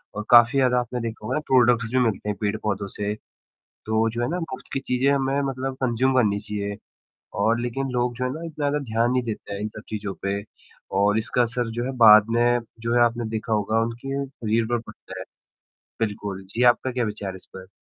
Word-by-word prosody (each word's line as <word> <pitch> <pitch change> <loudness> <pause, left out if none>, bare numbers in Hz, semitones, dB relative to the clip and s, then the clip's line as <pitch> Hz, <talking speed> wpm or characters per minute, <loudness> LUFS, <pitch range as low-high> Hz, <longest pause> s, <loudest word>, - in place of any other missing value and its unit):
और 105 0 -4
काफ़ी 120 +3 +7
ज़्यादा 125 -1 +3
आपने 125 0 -3
देखा 115 -2 -5
होगा 130 - -1
प्रोडक्ट्स 120 -3 +3
भी 130 - +3
मिलते 110 -4 0
हैं 105 - -1
पेड़-पौधों 105 -1 -1
से, 105 0 -2 0.7
तो 110 +1 +1
जो 115 +2 -4
है 120 - 0
ना 175 +3 -2
मुफ्त 165 -6 -7
की - - 0
चीजें 130 0 +1
हमें 135 0 +1
मतलब 135 0 -4
कंज़्यूम 130 +2 +2
करनी 105 -5 +3
चाहिए 100 -1 -4 0.7
और 115 +1 +2
लेकिन 120 +3 -2
लोग 125 0 0
जो 125 - -3
है - - 0
ना 155 - -7
इतना 155 -3 -4
ज़्यादा 145 +1 0
ध्यान 115 +2 +2
नहीं 125 0 +2
देते 110 -3 -5
हैं 100 - -5
इन 105 - -1
सब 110 0 -10
चीज़ों 105 -2 -4
पे 100 +1 -1 0.6
और 105 +1 +3
इसका 110 +3 +1
असर 120 0 -1
जो - - 0
है 135 - -2
बाद 105 0 +9
में 120 +1 +3 0.2
जो 115 +1 -1
है 120 - +4
आपने 120 0 0
देखा 110 0 -2
होगा 110 +1 +1
उनके 135 +5 -3
शरीर 115 -4 -1
पर 120 +1 0
पड़ता - - -11
है। - - -6 0.8
बिल्कुल। 100 -3 -3
जी, 120 - 0
आपका 125 +1 +4
क्या 125 -1 0
विचार 105 -2 -4
है 95 - -8
इस 95 - -14
पर? 95 0 -9
115 Hz, 220 wpm, -24 LUFS, 105-125 Hz, 0.8 s, बाद